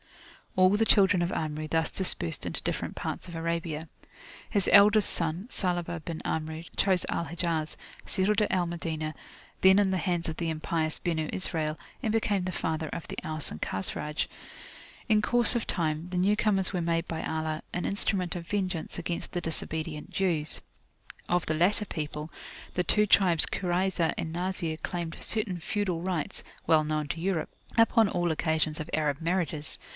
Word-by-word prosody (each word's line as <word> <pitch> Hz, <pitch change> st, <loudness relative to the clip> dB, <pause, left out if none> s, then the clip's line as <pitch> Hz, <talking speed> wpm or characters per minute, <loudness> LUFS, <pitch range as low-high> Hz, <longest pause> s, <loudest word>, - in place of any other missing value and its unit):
All 185 Hz, 0 st, +6 dB
the 210 Hz, +2 st, +3 dB
children 195 Hz, -4 st, +4 dB
of 175 Hz, +1 st, 0 dB
Amru 155 Hz, 0 st, -3 dB
thus 160 Hz, 0 st, 0 dB
dispersed 85 Hz, -, +2 dB
into -, -, -3 dB
different -, -, -3 dB
parts -, -, -4 dB
of 170 Hz, -, -8 dB
Arabia. 165 Hz, -1 st, -3 dB, 0.6 s
His 200 Hz, -3 st, +1 dB
eldest 205 Hz, +1 st, +7 dB
son, 170 Hz, +5 st, -2 dB
Salabah 175 Hz, -5 st, -1 dB
bin 165 Hz, 0 st, -5 dB
Amru, 160 Hz, 0 st, -3 dB
chose 190 Hz, -3 st, +2 dB
Al 170 Hz, -, -1 dB
Hijaz, 165 Hz, 0 st, -2 dB, 0.3 s
settled 205 Hz, +2 st, +2 dB
at 210 Hz, -, +1 dB
Al 180 Hz, -2 st, +2 dB
Madinah, 160 Hz, -2 st, -3 dB, 0.5 s
then 190 Hz, +1 st, +7 dB
in 195 Hz, -2 st, +3 dB
the 190 Hz, -, +1 dB
hands 175 Hz, 0 st, -1 dB
of 160 Hz, -, -3 dB
the 170 Hz, -1 st, -1 dB
impious 155 Hz, 0 st, -1 dB
Benu 160 Hz, -3 st, -1 dB
Israel, 160 Hz, -4 st, -1 dB, 0.3 s
and 220 Hz, -, +1 dB
became 210 Hz, -3 st, +1 dB
the 185 Hz, -, -2 dB
father 160 Hz, -2 st, -2 dB
of 170 Hz, -, -6 dB
the -, -, -7 dB
Aus 155 Hz, -1 st, 0 dB
and 75 Hz, -, -8 dB
Khazraj. 150 Hz, +10 st, -1 dB, 0.8 s
In 215 Hz, -3 st, +4 dB
course 240 Hz, +2 st, +7 dB
of 235 Hz, -, 0 dB
time, 160 Hz, -1 st, +1 dB
the 180 Hz, -, -3 dB
new 195 Hz, +4 st, +3 dB
comers 195 Hz, -3 st, +1 dB
were 180 Hz, -, 0 dB
made 165 Hz, 0 st, 0 dB
by 160 Hz, -1 st, -4 dB
Allah 160 Hz, 0 st, -2 dB
an 175 Hz, -, -2 dB
instrument 195 Hz, -3 st, 0 dB
of 170 Hz, -1 st, -6 dB
vengeance 185 Hz, -5 st, -2 dB
against 170 Hz, 0 st, -4 dB
the 175 Hz, -, -2 dB
disobedient 160 Hz, -1 st, -2 dB
Jews. 165 Hz, -6 st, 0 dB, 0.7 s
Of 175 Hz, -1 st, +1 dB
the 155 Hz, -, 0 dB
latter 190 Hz, +7 st, +2 dB
people, 150 Hz, -3 st, -5 dB, 0.4 s
the 180 Hz, -, 0 dB
two 210 Hz, +5 st, +4 dB
tribes 180 Hz, -5 st, +6 dB
Kurayzah 180 Hz, -2 st, 0 dB
and 160 Hz, -, -3 dB
Nazir 175 Hz, -2 st, -2 dB
claimed 170 Hz, -1 st, -4 dB
certain 210 Hz, -5 st, 0 dB
feudal 180 Hz, -1 st, -2 dB
rights 180 Hz, -4 st, -3 dB, 0.2 s
(well 155 Hz, -1 st, +5 dB
known 155 Hz, -1 st, -1 dB
to 165 Hz, -, -3 dB
Europe) 180 Hz, -3 st, -1 dB, 0.3 s
upon 225 Hz, -2 st, +5 dB
all 175 Hz, -3 st, 0 dB
occasions 155 Hz, -1 st, 0 dB
of 155 Hz, -, -7 dB
Arab 150 Hz, -1 st, 0 dB
marriages. 165 Hz, -3 st, -1 dB
170 Hz, 170 wpm, -28 LUFS, 160-190 Hz, 0.8 s, eldest